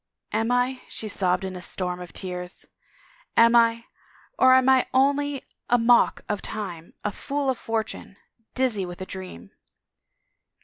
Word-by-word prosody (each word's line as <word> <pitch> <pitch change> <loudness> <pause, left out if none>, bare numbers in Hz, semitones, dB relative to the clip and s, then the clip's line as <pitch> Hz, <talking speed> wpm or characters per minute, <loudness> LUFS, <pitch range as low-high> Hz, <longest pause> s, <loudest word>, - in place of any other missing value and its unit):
"Am 225 +2 0
I?" 250 +1 +1
she 220 - -5
sobbed 185 -2 +1
in 190 -1 -4
a 180 - -7
storm 180 -1 -3
of 180 - -9
tears. 180 -1 -5 0.7
"Am 230 +1 +6
I?... 230 0 +4 0.5
Or 260 0 +7
am 260 0 +4
I 265 -1 +5
only 280 +1 +2 0.3
a 245 - +5
mock 240 +1 +4
of 210 -2 -2
time, 175 -6 -6
a 210 - -1
fool 280 +5 -2
of 255 - -5
fortune, 220 -3 -4 0.4
dizzy 250 -7 +1
with 175 0 -7
a - - -3
dream 185 - -9
225 Hz, 150 wpm, -25 LUFS, 185-255 Hz, 0.7 s, Or